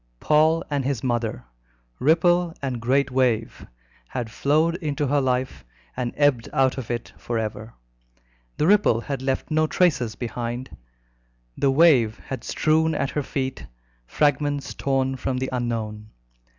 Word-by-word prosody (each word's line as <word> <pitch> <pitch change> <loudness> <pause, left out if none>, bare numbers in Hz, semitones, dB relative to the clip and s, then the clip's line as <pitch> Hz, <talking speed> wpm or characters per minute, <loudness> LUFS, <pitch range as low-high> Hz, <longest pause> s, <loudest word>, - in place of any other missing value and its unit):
Paul 160 +2 +3
and 140 -2 0
his 130 -3 -2
mother, 120 - -2 0.5
ripple 175 +3 +3
and 130 -4 -3
great 135 +3 +1
wave, 125 -4 0 0.4
had 120 - -5
flowed 155 +6 +2
into 150 -4 -2
her 145 +1 +2
life 130 0 -1 0.3
and 125 -2 -2
ebbed 145 -6 +2
out 135 -2 +2
of 120 - -7
it 120 -1 -4
for 120 - -3
ever. 110 0 -5 0.8
The 150 - +1
ripple 195 - +4
had 135 0 -4
left 135 +3 -2
no 155 0 +2
traces 145 -11 +1
behind: 120 +1 -5 0.8
the 140 - +1
wave 135 -7 +4
had 130 -3 -7
strewn 160 +1 +1
at 135 - -1
her 150 - -1
feet 130 -1 -4 0.4
fragments 145 - 0
torn 135 -1 0
from 130 0 -2
the 130 +1 -2
unknown. 110 -4 -3
135 Hz, 140 wpm, -24 LUFS, 120-150 Hz, 0.8 s, ripple